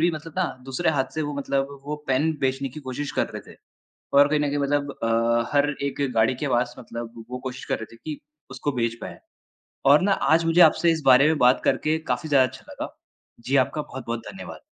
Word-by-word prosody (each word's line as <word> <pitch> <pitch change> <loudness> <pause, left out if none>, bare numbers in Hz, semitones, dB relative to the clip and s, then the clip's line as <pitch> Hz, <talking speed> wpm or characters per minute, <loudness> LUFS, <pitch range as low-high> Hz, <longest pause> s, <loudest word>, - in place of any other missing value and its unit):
भी 170 +2 +4
मतलब 160 0 -7
ना 185 - +2 0.2
दूसरे 135 +6 0
हाथ 140 -4 +1
से 155 - -1
वो 145 -1 -3
मतलब 140 0 -2
वो 150 +1 -3
पेन 135 +5 +2
बेचने 135 0 0
की 135 +4 -9
कोशिश 135 +1 -5
कर - - +2
रहे - - -9
थे। - - -18 0.6
और 140 0 +7
कहीं 150 0 +1
न 145 - +1
कहीं 145 +1 -1
मतलब 145 0 0
अ, 115 +1 +2
हर 145 0 +3
एक 140 0 -3
गाड़ी 110 +3 +3
के - - 0
पास 120 -1 0
मतलब 115 -1 -8
वो 125 - -4
कोशिश 130 -1 -6
कर - - -2
रहे 110 +1 -9
थे - - -14
कि 150 +5 -7 0.3
उसको 145 - -3
बेच 115 -2 -1
पाएँ। - - -8 0.7
और 140 +2 +7
ना 200 +2 +2 0.2
आज 165 +1 +3
मुझे 165 +2 +4
आपसे 170 +1 +5
इस 160 -1 -1
बारे 135 +2 +7
में 160 0 +2
बात 125 -1 +4
करके 155 +1 +1
काफ़ी 125 +6 -2
ज़्यादा 135 -3 +5
अच्छा - - -13
लगा। - - -7 0.4
जी, 130 +4 -2
आपका 135 +3 +2
बहुत-बहुत 125 -5 -5
धन्यवाद। 195 - -9
140 Hz, 225 wpm, -24 LUFS, 125-150 Hz, 0.7 s, और